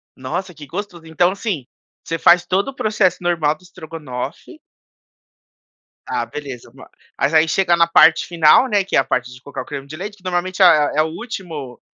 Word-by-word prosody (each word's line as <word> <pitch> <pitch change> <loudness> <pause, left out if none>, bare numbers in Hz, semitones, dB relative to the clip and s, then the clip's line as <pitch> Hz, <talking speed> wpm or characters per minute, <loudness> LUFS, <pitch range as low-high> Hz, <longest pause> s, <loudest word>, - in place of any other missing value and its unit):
Nossa, 180 +8 -5
que 150 -2 -11
gostoso. 175 -1 -7
Então 175 +3 +1
assim, 195 - -4 0.4
você 165 - -3
faz 175 +1 +5
todo 195 +7 0
o 270 - -9
processo 210 -6 +1
normal 165 -4 +1
do 170 - -24
estrogonofe 160 -8 -8 1.5
Ah, 120 - -2
beleza, 130 -4 -8
mas 130 - -15 0.3
mas 140 +3 0
aí 155 +1 +5
chega 175 +1 +2
na 170 0 +3
parte 165 -1 +5
final, 170 +8 +4
né, 205 -5 +1
que 195 - -3
é - - +6
a - - +2
parte 125 0 -2
de 125 - -15
colocar 140 - -7
o - - -9
creme 135 - -7
de 155 - -9
leite 205 +5 -7
que 185 - -25
normalmente 185 +1 -2
é 155 -4 +5
o 155 - 0
último 160 - -7
165 Hz, 190 wpm, -19 LUFS, 150-185 Hz, 1.5 s, é